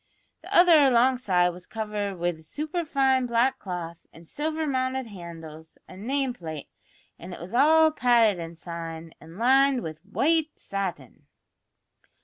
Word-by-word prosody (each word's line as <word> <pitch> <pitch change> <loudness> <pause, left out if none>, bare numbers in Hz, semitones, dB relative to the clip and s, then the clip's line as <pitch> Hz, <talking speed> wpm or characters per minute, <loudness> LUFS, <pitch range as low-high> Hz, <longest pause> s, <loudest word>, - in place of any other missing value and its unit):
The - - -13
other 345 -2 +6
alongside 240 -8 +3
was 180 0 -10
covered 210 -3 -4
wid 170 -2 -3
superfine 275 - 0
black 235 +3 +1
cloth 175 -3 -6
an' 165 - -15
silver 315 - -3
mounted 260 -2 -1
handles, 165 -5 -11
an' 200 +5 -10
name 270 -1 0
plate, 160 - -8 0.5
an' 180 +2 -9
it - - -9
was 175 +5 -9
all 315 +5 +5
padded 235 - +3
inside 165 -1 -7
an' 165 +3 -13
lined 265 +2 +3
wid 155 -1 -7
white 305 +10 0
satin!" 185 -10 -6
210 Hz, 130 wpm, -26 LUFS, 170-265 Hz, 0.5 s, other